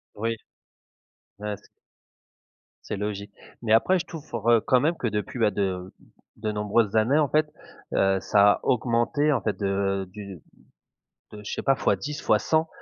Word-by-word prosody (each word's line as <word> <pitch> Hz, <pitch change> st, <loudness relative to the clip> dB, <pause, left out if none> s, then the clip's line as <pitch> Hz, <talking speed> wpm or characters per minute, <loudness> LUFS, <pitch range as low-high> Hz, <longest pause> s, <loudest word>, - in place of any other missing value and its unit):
Oui. 115 Hz, +2 st, -1 dB, 1.0 s
Ah, 105 Hz, 0 st, -3 dB
c'est -, -, -23 dB, 1.2 s
c'est 105 Hz, -, -3 dB
logique. 100 Hz, 0 st, -4 dB, 0.3 s
Mais, 110 Hz, -2 st, +1 dB
après, 180 Hz, +11 st, +4 dB
je 170 Hz, -, -4 dB
trouve, 120 Hz, -9 st, -4 dB
heu, 115 Hz, -2 st, +5 dB
quand 125 Hz, -, +3 dB
même, 160 Hz, +6 st, +1 dB
que 120 Hz, -, -2 dB
depuis, 105 Hz, +3 st, -3 dB
bah, 110 Hz, -2 st, +3 dB
de 95 Hz, -2 st, -2 dB, 0.4 s
de 110 Hz, 0 st, -2 dB
nombreuses 105 Hz, +1 st, +1 dB
années, 115 Hz, +7 st, +3 dB
en 150 Hz, -, +3 dB
fait, 155 Hz, 0 st, +1 dB, 0.4 s
heu, 95 Hz, 0 st, +3 dB
ça 105 Hz, 0 st, +5 dB
a -, -, -5 dB
augmenté, 125 Hz, +5 st, +1 dB
en 125 Hz, -, 0 dB
fait, 100 Hz, -1 st, -2 dB
de 100 Hz, -1 st, 0 dB
du 100 Hz, -5 st, -9 dB, 0.9 s
de 105 Hz, 0 st, -9 dB
je -, -, -5 dB
sais -, -, -3 dB
pas, 135 Hz, -1 st, +3 dB
fois 100 Hz, -, +2 dB
10, 150 Hz, +9 st, -5 dB
fois 105 Hz, -, +3 dB
100, 160 Hz, +7 st, +1 dB
110 Hz, 175 wpm, -25 LUFS, 100-125 Hz, 1.2 s, heu